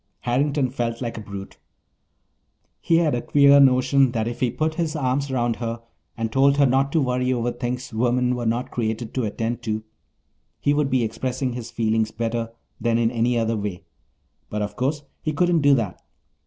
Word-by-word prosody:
Harrington 135 +1 +1
felt 120 -3 -2
like 120 -2 -4
a 110 - -6
brute. 100 -2 -9 1.2
He 165 - +2
had 165 -3 +2
a 120 - 0
queer 140 0 +5
notion 130 -1 +4
that 110 -2 -1
if 120 - -5
he 125 - +2
put 155 +6 -1
his 165 -1 -2
arm 135 -2 0
around 120 -3 0
her 115 -1 -4 0.4
and 115 -1 -2
told 140 +3 +4
her 145 - +5
not 135 +2 +2
to 160 - +3
worry 125 -1 0
over 120 -1 0
things 125 0 -4
women 125 +2 +1
were 120 -2 -2
not 120 +3 -1
created 110 0 -3
to 130 -3 -1
attend 115 +3 -3
to 110 -2 -3 0.8
he 145 - +2
would 145 -1 +1
be 130 -2 +2
expressing 125 +3 -2
his 120 -1 -6
feelings 110 -1 0
better 115 0 -2 0.3
than 115 -1 +1
in 115 -1 +2
any 120 0 +1
other 115 0 +1
way. 100 -4 -4 0.7
But 105 0 -2
of 105 - -5
course 145 +4 -1 0.2
he 155 - -2
couldn't 175 +1 +2
do 140 -1 +5
that. 110 -8 -3
125 Hz, 190 wpm, -23 LUFS, 115-135 Hz, 1.2 s, queer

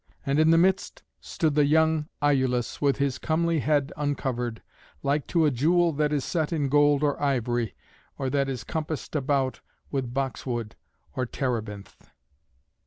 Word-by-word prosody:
And 140 +2 +1
in 155 0 +5
the 165 - +6
midst 190 +3 +1 0.2
stood 160 -3 -1
the 145 -1 +3
young 160 0 +3 0.2
Iülus, 130 -4 +1
with 140 -2 +2
his 140 -2 -1
comely 165 0 +1
head 145 0 +1
uncovered, 130 -5 -2 0.4
like 145 +1 0
to 165 -3 +2
a 150 - +3
jewel 165 +6 +2
that 150 +1 0
is 145 -3 0
set 160 -3 -1
in 145 -4 0
gold 145 0 +4
or 145 -1 0
ivory, 120 -6 0 0.4
or 135 - -2
that 140 -1 +1
is 130 -3 -4
compassed 155 -2 -4
about 135 -2 0 0.3
with 130 -4 -2
boxwood 125 -4 -3 0.4
or 130 -1 -1
terebinth. 110 -6 -4
140 Hz, 155 wpm, -26 LUFS, 130-155 Hz, 0.4 s, the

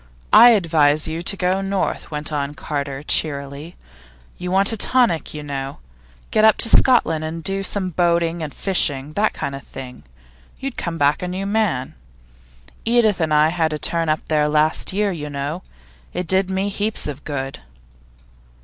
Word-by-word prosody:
'I 235 +3 +10
advise 155 -8 +3
you 160 +1 -4
to 195 +3 -2
go 185 +1 0
north,' 195 0 -2
went 150 0 -5
on 145 0 -2
Carter 140 -2 -4
cheerily. 145 +1 -1 0.6
'You 180 - -4
want 195 +3 +2
a - - -1
tonic, 235 -7 +1
you 150 - -6
know. 140 -1 -5 0.5
Get 215 - +2
up 220 -1 +7
into 230 - +4
Scotland 165 -14 +4
and 160 +1 -5
do 195 +2 -2
some 195 -1 -2
boating 170 0 +1
and 155 -2 -4
fishing 150 -7 0
that 215 +4 +1
kind 140 - -4
of 135 - -6
thing. 130 -2 -10 0.6
You'd 270 -2 -5
come 170 -1 -4
back 145 0 +2
a 180 - -3
new 185 +2 -4
man. 200 -11 0 0.9
Edith 225 -5 +2
and 160 -1 0
I 150 +1 +4
had 160 -2 0
a - - -2
turn 165 +1 -1
up 155 - +1
there 150 -1 +2
last 155 +1 +1
year, 205 +1 0
you 150 -4 -5
know; 145 +5 -4 0.5
it 180 - -3
did 190 +2 +1
me 190 +1 -1
heaps 210 +2 -1
of 150 -1 -6
good. 135 -2 -5
165 Hz, 175 wpm, -20 LUFS, 150-195 Hz, 0.9 s, I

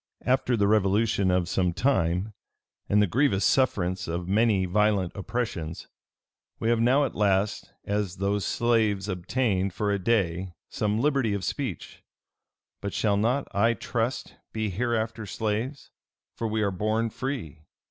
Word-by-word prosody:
After 125 -1 +2
the 100 -1 +3
revolution 105 -1 +2
of 90 -1 +1
some 90 -1 0
time, 90 -3 +1 0.6
and 105 0 +4
the - - +4
grievous 105 - +2
sufferance 95 -9 +1
of 85 +1 -3
many 100 -1 +3
violent 100 -1 +1
oppressions, 100 -7 -4 0.7
we 115 - -1
have 120 -1 +3
now 130 +5 +4
at - - -4
last, 100 0 0
as 100 -3 -1
those 100 +1 0
slaves, 110 -4 +1
obtained, 95 0 -1
for 105 -1 0
a 100 - 0
day, 95 -4 0 0.2
some 105 +1 -1
liberty 135 -6 +1
of 100 - -4
speech; 130 - -4 0.8
but 100 -1 -4
shall 105 -2 +2
not, 120 +7 +1
I 115 +4 +3
trust, 115 +4 -3
be 110 -2 -2
hereafter 110 +1 -2
slaves: 110 +7 -3 0.4
for 115 - -2
we 110 0 0
are 100 - +1
born 110 +4 0
free. 110 - -5
105 Hz, 145 wpm, -27 LUFS, 95-115 Hz, 0.8 s, and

